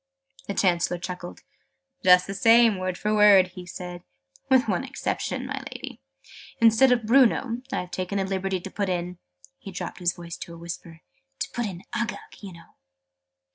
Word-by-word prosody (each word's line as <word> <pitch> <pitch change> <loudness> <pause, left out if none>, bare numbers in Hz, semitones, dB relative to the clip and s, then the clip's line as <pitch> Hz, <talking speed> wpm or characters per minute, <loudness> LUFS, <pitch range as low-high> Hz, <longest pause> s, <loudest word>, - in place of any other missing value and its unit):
The 200 - -3
Chancellor 175 -1 +1
chuckled. 180 0 -7 0.6
"Just 180 -1 +6
the 195 - -5
same, 225 0 +5
word 185 -1 -3
for 210 0 -1
word," 205 -3 +6
he 180 0 -11
said, 180 0 -7 0.5
"with 260 0 +4
one - - 0
exception, - - -3
my - - -4
Lady. - - -8 0.6
Instead 230 +3 +5
of 240 -3 +2
'Bruno,' 245 0 +3
I've 180 -8 -3
taken 185 +2 -3
the 195 - 0
liberty 190 0 -2
to 190 - -8
put 200 -2 -2
in 180 0 -3 0.2
" 90 - -21
he - - -9
dropped 185 +1 -6
his 175 -1 +1
voice 170 -1 -8
to 170 - -9
a - - -12
whisper, 170 -1 -8 0.4
"to - - -1
put 240 -2 -2
in 185 -2 -8
'Uggug,' 235 0 -5
you 200 -2 -8
know!" 170 -1 -16
190 Hz, 175 wpm, -25 LUFS, 180-215 Hz, 0.6 s, Just